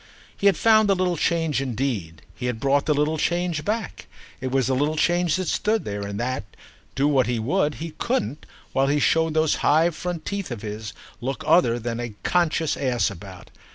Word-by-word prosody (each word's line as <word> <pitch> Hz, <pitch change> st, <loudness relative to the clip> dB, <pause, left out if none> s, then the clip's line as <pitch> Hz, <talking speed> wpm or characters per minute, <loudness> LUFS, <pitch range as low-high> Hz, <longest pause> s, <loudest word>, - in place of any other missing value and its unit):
He 200 Hz, -, +2 dB
had 195 Hz, -5 st, +4 dB
found 220 Hz, -2 st, +5 dB
the 195 Hz, -, +4 dB
little 180 Hz, -1 st, 0 dB
change 165 Hz, -3 st, 0 dB
indeed, 115 Hz, -, -3 dB
he 125 Hz, -, -4 dB
had 120 Hz, -3 st, -2 dB
brought 140 Hz, +3 st, +1 dB
the 150 Hz, -, +4 dB
little 150 Hz, +2 st, +1 dB
change 175 Hz, -2 st, 0 dB
back; 215 Hz, -1 st, -3 dB, 0.3 s
it 130 Hz, +1 st, -3 dB
was 130 Hz, -1 st, +1 dB
the 130 Hz, -, +1 dB
little 145 Hz, +4 st, +1 dB
change 175 Hz, +1 st, +2 dB
that 185 Hz, -1 st, -2 dB
stood 215 Hz, +1 st, 0 dB
there 100 Hz, 0 st, -4 dB
and 100 Hz, 0 st, -4 dB
that, 130 Hz, +1 st, -2 dB, 0.5 s
do 140 Hz, +2 st, +2 dB
what 135 Hz, -4 st, +3 dB
he 120 Hz, -1 st, 0 dB
would, 150 Hz, -, 0 dB
he 165 Hz, +1 st, -6 dB
couldn't, 245 Hz, -, -2 dB, 0.3 s
while 135 Hz, +1 st, +2 dB
he 145 Hz, +1 st, +2 dB
showed 160 Hz, +1 st, +2 dB
those 155 Hz, -1 st, +2 dB
high 160 Hz, +4 st, +4 dB
front 175 Hz, 0 st, -5 dB
teeth 200 Hz, -2 st, -3 dB
of 115 Hz, -4 st, -6 dB
his, 105 Hz, 0 st, -6 dB, 0.3 s
look 135 Hz, +2 st, -3 dB
other 120 Hz, -9 st, +4 dB
than 120 Hz, 0 st, -4 dB
a 120 Hz, -3 st, -5 dB
conscious 165 Hz, -3 st, +1 dB
ass 125 Hz, -6 st, 0 dB
about. 95 Hz, -1 st, -11 dB
145 Hz, 200 wpm, -24 LUFS, 120-175 Hz, 0.5 s, found